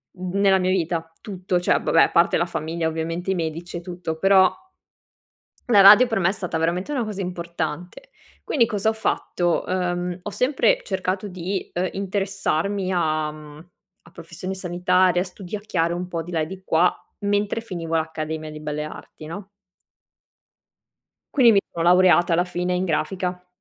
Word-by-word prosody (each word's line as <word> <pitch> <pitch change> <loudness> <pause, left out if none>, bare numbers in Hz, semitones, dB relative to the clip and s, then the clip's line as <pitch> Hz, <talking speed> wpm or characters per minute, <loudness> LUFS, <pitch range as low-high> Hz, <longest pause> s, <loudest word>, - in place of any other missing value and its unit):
n 185 +1 -4
nella 195 -1 +5
mia 185 0 +1
vita, 165 -2 -1
tutto. 185 -3 -2
Cioè, 175 - +2
vabbè, 165 - +3
a - - +1
parte 170 +1 +3
la 170 - +1
famiglia 165 0 -3
ovviamente 165 +3 -3
i - - 0
medici 170 +1 -4
e - - -6
tutto 175 -2 -5
però 190 +1 +5 1.2
la 225 -6 +5
radio 205 +6 +9
per 225 -4 -1
me 175 -2 +2
è - - +1
stata 180 -5 -3
veramente 175 - -1
una 260 -5 0
cosa 210 -2 -5
importante. 175 - -5 0.3
Quindi 240 -6 +2
cosa 215 -2 -1
ho - - +3
fatto: 175 -5 -1
uhm, 180 -1 -2
ho 210 - -5
sempre 285 - +2
cercato 190 +1 -3
di, 185 +1 -4
uhm, 180 +1 -1
interessarmi 195 -1 -2
a 155 -3 0
mhmm, 150 +2 -13 0.3
a 170 - -17
professioni 170 +3 -7
sanitarie, 180 0 +2
a - - 0
studiacchiare 185 -2 -3
un 180 +1 -4
po' 170 -2 -3
di 175 +2 -10
là 165 - 0
e 155 - -1
di 190 +3 -9
qua, 175 +1 +3 0.3
mentre 205 +1 0
finivo 170 -7 -5
l'accademia 160 -1 -3
di 155 0 -9
belle 150 0 -4
arti 155 0 -10
no? 195 +5 -8 1.8
Quindi 245 -5 +6
mi 200 - +4
son 165 -1 -2
laureata 175 0 +5
alla 175 +2 +3
fine 180 0 -2
in 180 +1 0
grafica. 180 +1 -2
180 Hz, 170 wpm, -23 LUFS, 165-195 Hz, 1.8 s, radio